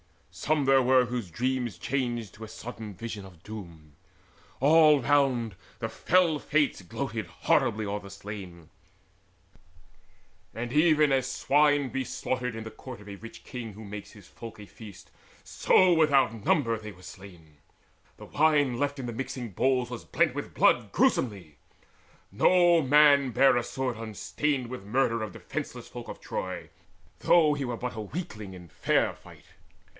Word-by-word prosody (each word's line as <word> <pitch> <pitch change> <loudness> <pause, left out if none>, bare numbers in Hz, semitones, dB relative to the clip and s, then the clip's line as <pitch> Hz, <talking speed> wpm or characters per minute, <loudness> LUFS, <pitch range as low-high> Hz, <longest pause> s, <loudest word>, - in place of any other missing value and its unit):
Some 150 -2 0
there 135 0 +5
were 130 0 +4
whose 120 -5 -4
dreams 125 +1 -2
Changed 120 -3 -2
to 110 +1 -9
a - - -11
sudden 110 -2 -8
vision 110 0 -6
of 90 -3 -16
doom. 85 -8 -10 0.6
All 150 0 +6
round 125 -6 +2 0.2
The - - -3
fell 170 -4 +2
Fates 150 -7 0
gloated 110 +2 -4
horribly 105 +5 +1
o'er 100 +1 -3
the 100 -1 -12
slain. 95 -5 -9 1.9
And 120 +1 -4
even 155 -1 +4
as 130 -1 +1
swine 145 +2 +2
be 135 +1 -2
slaughtered 125 -1 -3
in 115 - -6
the 110 - -8
court 130 -4 -10
Of 105 - -12
a 100 - -8
rich 115 +2 -12
king 115 -4 -7
who 110 +3 -11
makes 100 0 -8
his 105 -4 -15
folk 115 -1 -10
a 105 - -9
feast, 100 -2 -13 0.3
So 185 -1 +4
without 140 -9 +2
number 150 -9 +2
were 115 - -1
they 105 -4 -10
slain. 90 -5 -13 0.6
The - - -11
wine 145 -5 +2
Left 145 0 -1
in 130 - -5
the 120 - -4
mixing 125 -1 -5
bowls 125 +4 +1
was 120 - -7
blent - - +1
with - - -6
blood - - +3
Gruesomely. 95 - 0 0.7
No 175 -2 +4
man 140 -1 +5
bare 135 +3 +5
a 120 - 0
sword 130 -2 -3
unstained 125 +5 -2
With 125 -4 -7
murder 115 +1 +1
of 110 -3 -5
defenceless - - -6
folk - - -9
of - - -8
Troy, - - -5 0.5
Though 155 -4 +4
he 140 -2 -3
were 120 -2 -4
but 125 -1 -5
a 110 - -4
weakling 105 - -7
in 90 -2 -12
fair - - +1
fight. - - -17
120 Hz, 160 wpm, -28 LUFS, 105-140 Hz, 1.9 s, All